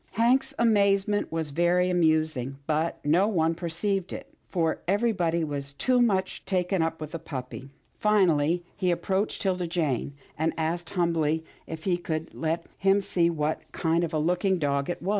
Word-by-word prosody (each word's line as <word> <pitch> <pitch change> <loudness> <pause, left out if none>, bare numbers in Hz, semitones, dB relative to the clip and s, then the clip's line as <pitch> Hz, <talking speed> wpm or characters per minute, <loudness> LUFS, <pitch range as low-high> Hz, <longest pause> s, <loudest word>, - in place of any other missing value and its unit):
Hank's 240 +5 +3
amazement 205 -2 +2
was 160 -2 -2
very 175 +3 +2
amusing, 155 -6 +1
but 160 +2 0
no 175 +7 +4
one 165 -6 +1
perceived 175 +3 -2
it, - - -8 0.2
for 165 -3 0
everybody 185 -5 +1
was 140 -2 -4
too 250 - +2
much 190 -5 +1
taken 185 -1 0
up 165 0 -1
with 155 -1 -6
the 165 - -5
puppy. 130 -3 -7 0.2
Finally 175 -6 +2
he 185 -2 0
approached 190 +4 -1
'Tilda 180 -3 0
Jane, 150 -5 -1 0.2
and 160 +1 +1
asked 170 +2 -2
humbly, 160 -2 +1 0.2
if 160 -1 -7
she 175 -2 0
would 160 0 -2
let 165 +1 -2
him 195 +1 +4
see 175 -3 +1
what 155 -2 -1
kind 165 0 +1
of 165 - -2
a 160 - 0
looking 180 +4 +1
dog 140 -2 0
it 175 - -4
was. 190 - -2
170 Hz, 165 wpm, -27 LUFS, 160-190 Hz, 0.2 s, no